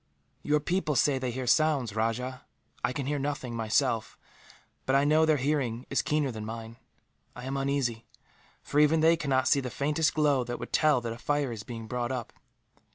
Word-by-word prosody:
"Your 150 0 +2
people 165 -1 -1
say 135 +1 +3
they 130 -1 -2
hear 130 +1 -4
sounds, 135 -4 +2
Rajah. 125 +4 -2 0.4
I 125 - +1
can 135 +1 -3
hear 145 +1 -1
nothing, 135 -4 -3
myself, 115 +1 0 0.7
but 130 - +3
I 140 - +4
know 155 +2 +4
their 155 -1 +4
hearing 130 -4 -1
is 135 - +2
keener 150 -3 0
than 110 -2 -6
mine. 115 +1 -7 0.6
I 125 - -8
am 135 +1 -3
uneasy, 135 -4 -1 0.6
for 145 - 0
even 155 +1 +4
they 165 +1 +5
cannot 135 -5 0
see 140 - +4
the 130 -2 -4
faintest 150 +4 0
glow 145 -4 +3
that 120 0 -4
would - - -8
tell 150 -5 +4
that 115 -1 -4
a 115 - -11
fire 145 0 0
is 110 -3 -6
being 115 0 -7
brought 120 +2 -3
up. 125 -3 -4
130 Hz, 195 wpm, -28 LUFS, 120-145 Hz, 0.7 s, they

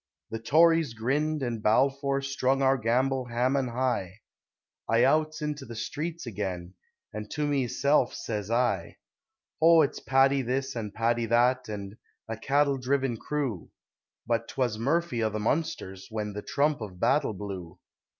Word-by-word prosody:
The 115 - -3
Tories 160 +1 +4
grinned, 145 +6 0
and 115 -3 -3
Balfour 135 +5 +2
strung 135 -1 0
our 135 0 +4
gamble 130 +2 +1
Haman 125 +3 0
high, 120 -5 -2 0.7
I 115 +1 +4
outs 155 +3 +2
into 150 -2 -3
the 120 -3 -9
street 155 +8 -4
again, 95 -5 -4 0.4
and 105 0 -6
to 150 +1 -2
meself 140 -1 +1
sez 105 -2 -4
I: 115 -8 0 0.6
O, 165 0 +7
it's 140 - -2
Paddy 135 +1 +3
this, 130 +2 -2
and 110 -3 -4
Paddy 115 +2 0
that, 120 +2 +2
an' 100 0 -7 0.3
"A 115 - -3
cattle 140 +4 +1
driven 130 -1 0
crew!" 130 - -3 0.6
But 115 0 0
'twas 120 -5 -1
"Murphy 140 -1 0
o' 110 - +2
the 110 0 -4
Munsters!" 105 - -2
when 105 -2 -4
the 105 - -5
trump 145 +2 0
of 95 -4 -7
battle 105 - +2
blew. 95 -4 -7
125 Hz, 150 wpm, -28 LUFS, 110-140 Hz, 0.7 s, O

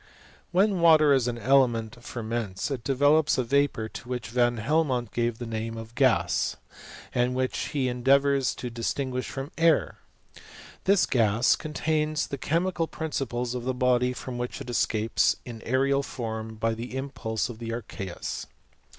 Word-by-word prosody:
When 190 +1 +3
water, 155 -3 +6
as 130 -3 +2
an 120 -1 -2
element, 120 -2 +2
ferments, 115 -2 -3
it 125 -4 -3
develops 145 +3 +3
a 130 - +2
vapour, 140 -3 +1
to 120 - -10
which 125 -3 -4
Van 120 0 +2
Helmont 130 -1 0
gave 120 -1 -1
the 120 - -6
name 115 0 -4
of 115 0 -8
gasy 120 -10 +2 0.6
and 125 +1 +1
which 130 0 -1
he 135 -3 -1
endeavours 135 +2 +2
to 125 - -6
distinguish 125 +2 -2
from 135 +2 -6
air. 165 -1 +3 0.9
This 195 0 +4
gas 115 0 +3
contains 155 -1 -1
the 140 - -6
chemical 170 +3 0
principles 125 -7 -3
of 125 -1 -4
the 130 0 -1
body 125 0 +2
from 125 -1 -6
which 125 +2 -4
it 130 -3 -6
escapes 110 -1 +2
in 120 -2 -7
an - - -14
aerial 135 +3 +2
form 110 -4 -5
by 115 +1 0
the 120 +3 -6
impulse 120 -5 -3
of 120 -3 -9
the 115 -1 -5
archeus. 100 -6 -5
125 Hz, 160 wpm, -27 LUFS, 115-140 Hz, 0.9 s, water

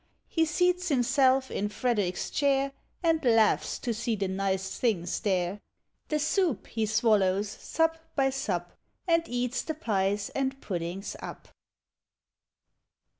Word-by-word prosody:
" - - -46
He 325 -1 +2
seats 360 +3 +1
himself 265 0 +3
in 205 +1 -1
Frederick's 205 -5 -1
chair, 275 -1 +2 0.3
And 325 -2 +2
laughs 225 -3 +3
to 240 - -2
see 230 +1 -1
the 200 -2 -1
nice 190 0 -2
things 185 -8 0
there: 190 0 0 0.5
The 305 - 0
soup 320 - +1
he 220 -1 -2
swallows 210 -3 +2
sup 325 +6 0 0.2
by 270 -2 +3
sup. 180 -10 -3 0.3
And 335 -1 +4
eats 245 +1 -1
the 315 - -4
pies 200 -7 0
and 270 0 -1
puddings 180 -1 -4
up. - - -9
230 Hz, 130 wpm, -28 LUFS, 195-275 Hz, 0.5 s, And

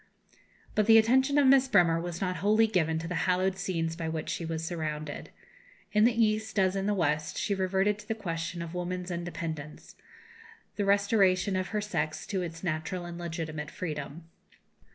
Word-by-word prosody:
But 215 0 +1
the 225 0 +8
attention 260 +6 +4
of 290 - +5
Miss 265 0 +6
Bremer 175 -8 +4
was 175 -1 -5
not 185 -2 -1
wholly 210 +6 +4
given 165 -7 +1
to 165 +1 -4
the 180 - -3 0.2
hallowed 185 +1 +2
scenes 165 -4 -2
by 165 -1 -3
which 160 -1 -4
she - - -3
was 160 0 -3
surrounded. 155 -3 -4 0.6
In 210 +1 +4
the 230 -1 +4
East, 220 0 -2
as 190 -1 +3
in 195 0 -1
the 210 - +1
West, 155 -3 0
she 200 +1 0
reverted 195 +2 +1
to 210 - -13
the 220 - -1
question 170 -3 -4
of 170 0 -8
woman's 180 0 -4
independence, 165 -3 -6 0.8
the 205 - -1
restoration 200 -2 +3
of 185 -1 -1
her 210 -1 -2
sex 160 -7 -2
to 190 -2 -2
its 165 -1 -6
natural 175 +1 -3
and 175 0 -7
legitimate 160 -3 -4
freedom. 155 -2 -5
180 Hz, 180 wpm, -29 LUFS, 165-205 Hz, 0.8 s, the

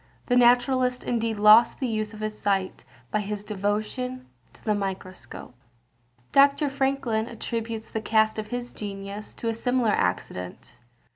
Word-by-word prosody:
This 245 - +2
naturalist 250 +1 +3
indeed 230 -2 -1
lost 210 +3 +6
the 265 - -1
use 215 -3 -2
of 215 -1 -10
his 215 0 -3
sight 195 - -1 0.3
by 215 - +1
his 205 0 -4
devotion 215 +5 -3 0.3
to - - -20
the 215 - +2
microscope. 185 -11 -6 0.8
Dr. 280 +1 +4
Franklin 270 -5 0
attributes 230 -1 -4
the 220 - -2
cast 220 0 +2
of 215 - -4
his 245 +2 -5
genius 200 0 -7
to 230 - -5
a 225 - +1
similar 245 0 +1
accident. 90 - -3
220 Hz, 145 wpm, -26 LUFS, 205-245 Hz, 0.8 s, lost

